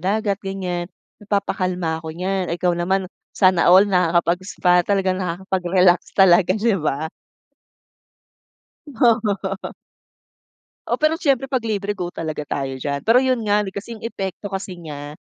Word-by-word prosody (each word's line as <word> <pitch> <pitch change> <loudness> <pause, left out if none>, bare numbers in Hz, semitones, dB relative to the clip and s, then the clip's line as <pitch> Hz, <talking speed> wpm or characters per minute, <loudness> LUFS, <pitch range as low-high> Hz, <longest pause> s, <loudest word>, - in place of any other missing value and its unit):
dagat 200 +2 -1
ganyan, 180 -3 -4 0.3
napapakalma 185 -5 -1
ako 160 - -8
niyan. 185 +1 -2
Ikaw 180 0 +1
naman, 185 +3 0 0.3
sana 185 -4 +4
all 190 +3 +8
nakakapag-spa. 180 0 +2
Talagang 190 0 0
nakakapag-relax 180 0 +1
talaga 185 0 +5
'di 210 -3 +1
ba? 150 0 -1 1.8
Oo. 220 -7 0 1.2
Oo, - - 0
pero 310 +1 +2
siyempre 275 -5 +1
'pag 260 -3 -1
libre, 205 -2 -2
go 180 -3 -4
talaga 155 -3 -4
tayo 135 -2 -3
diyan. 140 +4 -4
Pero 245 +3 +5
'yon 260 -1 +1
nga, 205 +1 +3
kasi 205 +4 -7
yung 220 - -13
epekto 195 -3 -5
kasi 195 -1 -5
niya, 150 -3 -8
190 Hz, 130 wpm, -21 LUFS, 175-205 Hz, 1.8 s, all